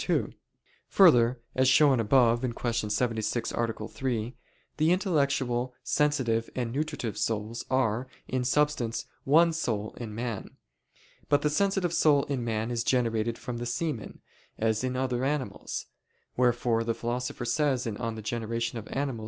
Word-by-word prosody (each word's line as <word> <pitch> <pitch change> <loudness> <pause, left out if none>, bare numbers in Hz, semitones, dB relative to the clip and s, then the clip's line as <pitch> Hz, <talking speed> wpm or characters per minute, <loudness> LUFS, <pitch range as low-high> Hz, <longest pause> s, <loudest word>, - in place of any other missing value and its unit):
2: - - +1 0.5
Further, 125 -10 +5
as 130 0 +3
shown 135 -1 +5
above 120 +1 +4
(Q. 115 -3 -2
76, 115 +1 -1
A. 115 -2 -2
3), 120 -2 -3 0.4
the 155 +2 +3
intellectual, 140 -9 +1
sensitive, 130 -7 +1
and 120 -3 -2
nutritive 135 -7 -3
souls 110 +1 -2
are, 125 -1 +1 0.2
in 130 -1 -1
substance, 130 -3 0 0.2
one 165 +4 +5
soul 110 -10 -2
in 110 -3 -6
man. 115 -3 -5 0.7
But 145 -1 +3
the 150 - +2
sensitive 195 0 +1
soul 145 -4 +4
in 135 -4 -3
man 110 0 -2
is 115 -1 -1
generated 115 -2 +1
from 120 -1 -5
the 120 - -3
semen, 125 -2 -3 0.4
as 110 +1 0
in 130 0 -1
other 130 -1 -1
animals; 140 -1 -3 0.5
wherefore 120 -2 +2
the 115 0 -1
Philosopher 120 +1 -3
says 130 0 +1
(De 115 - -2
Gener. 115 0 -3
Animal. 135 -4 -1
120 Hz, 135 wpm, -28 LUFS, 115-140 Hz, 0.7 s, Further